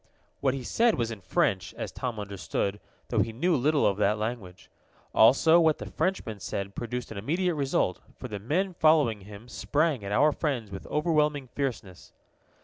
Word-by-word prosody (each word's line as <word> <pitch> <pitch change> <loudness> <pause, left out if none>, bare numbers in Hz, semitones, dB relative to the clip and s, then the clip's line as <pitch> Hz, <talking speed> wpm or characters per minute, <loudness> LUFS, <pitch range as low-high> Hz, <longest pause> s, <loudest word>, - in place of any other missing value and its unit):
What 135 -1 +1
he 135 - -5
said 230 - +2
was 115 -2 -1
in 110 -3 -7
French, 95 0 0
as - - -5
Tom 120 -4 -4
understood, 100 0 -3 0.3
though - - +1
he 115 - +1
knew 165 +10 +1
little 145 +3 +2
of 100 - +2
that 105 +1 +2
language. 105 -5 -5 0.4
Also, 160 +9 +6
what 160 -2 +3
the - - -8
Frenchman 115 - -2
said 100 +1 -4
produced 120 +2 -5
an 105 - -5
immediate 175 - 0
result, 135 - 0 0.2
for - - -7
the 105 -1 -5
men 180 - -1
following 150 -10 +3
him 105 +3 -12
sprang 145 0 0
at 100 - -5
our 150 +9 +4
friends 130 -10 -2
with 95 - -8
overwhelming 150 -4 +1
fierceness. 120 -10 -5
120 Hz, 175 wpm, -28 LUFS, 105-150 Hz, 0.4 s, Also